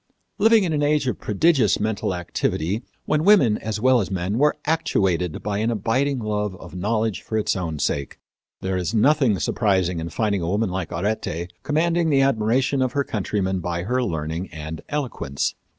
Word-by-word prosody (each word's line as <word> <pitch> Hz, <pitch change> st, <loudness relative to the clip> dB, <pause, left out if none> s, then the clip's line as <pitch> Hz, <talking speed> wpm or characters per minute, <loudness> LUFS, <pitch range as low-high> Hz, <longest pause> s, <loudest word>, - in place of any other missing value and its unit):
Living 225 Hz, 0 st, +5 dB
in 170 Hz, -4 st, -1 dB
an 150 Hz, -, 0 dB
age 145 Hz, -1 st, +2 dB
of 125 Hz, -, -2 dB
prodigious 125 Hz, -, +2 dB
mental 105 Hz, -3 st, -1 dB
activity, 90 Hz, +3 st, -2 dB, 0.2 s
when 155 Hz, 0 st, +1 dB
women, 170 Hz, -, +5 dB
as 110 Hz, -1 st, -3 dB
well 130 Hz, +1 st, +4 dB
as 95 Hz, -, -3 dB
men, 95 Hz, +4 st, -2 dB
were 150 Hz, +1 st, +3 dB
actuated 95 Hz, -, 0 dB
by 105 Hz, -1 st, -1 dB
an 110 Hz, +2 st, +1 dB
abiding 130 Hz, +6 st, 0 dB
love 105 Hz, -3 st, -2 dB
of -, -, -12 dB
knowledge 110 Hz, +3 st, -1 dB
for 110 Hz, -, -3 dB
its 110 Hz, -, 0 dB
own 85 Hz, -5 st, -3 dB
sake, 70 Hz, -1 st, -2 dB, 0.4 s
there 95 Hz, 0 st, -1 dB
is 90 Hz, +4 st, -2 dB
nothing 130 Hz, -2 st, +3 dB
surprising 95 Hz, -5 st, +1 dB
in 80 Hz, +1 st, -4 dB
finding 100 Hz, +2 st, 0 dB
a 85 Hz, -, -2 dB
woman 105 Hz, 0 st, 0 dB
like 90 Hz, -2 st, -3 dB
Arete 90 Hz, -2 st, -3 dB
commanding 165 Hz, +2 st, +1 dB
the 140 Hz, -2 st, +4 dB
admiration 130 Hz, +1 st, +2 dB
of 130 Hz, -1 st, 0 dB
her 140 Hz, -, +1 dB
countrymen 95 Hz, -4 st, -1 dB
by 85 Hz, 0 st, -3 dB
her 125 Hz, +6 st, 0 dB
learning 80 Hz, -3 st, -3 dB
and 80 Hz, +1 st, -7 dB
eloquence. 130 Hz, -, -2 dB
105 Hz, 180 wpm, -23 LUFS, 90-135 Hz, 0.4 s, Living